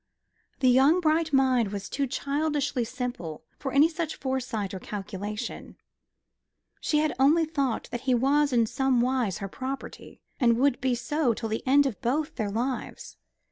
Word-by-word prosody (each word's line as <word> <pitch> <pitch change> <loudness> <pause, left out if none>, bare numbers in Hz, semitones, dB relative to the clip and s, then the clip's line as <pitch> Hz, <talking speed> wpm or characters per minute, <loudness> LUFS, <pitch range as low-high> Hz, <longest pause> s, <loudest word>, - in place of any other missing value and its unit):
The 260 - +4
young 270 +7 +5
bright 320 -1 +1
mind 260 -6 +3
was 200 -1 -5
too 275 0 -1
childishly 285 -1 -1
simple 230 - -5 0.2
for 270 - -3
any 280 +4 +6
such 325 -1 -4
foresight 255 -7 -3
or 190 - -5
calculation. 210 +3 -6 1.0
She 300 - 0
had 305 0 +1
only 310 +5 +5
thought 280 -6 -2
that 240 - -4
he 255 -1 +2
was 280 +4 +2
in 235 -2 +3
somewise 250 -4 +1
her 200 - -5
property, 265 +7 -7 0.2
and 235 -4 +4
would 270 0 +2
be 255 -1 +1
so 255 0 0
till 225 0 -4
the 220 - -2
end 280 +2 +5
of 260 -7 -3
both 290 +6 -1
their 215 -4 -2
lives. 245 +5 -4
260 Hz, 160 wpm, -27 LUFS, 230-285 Hz, 1.0 s, any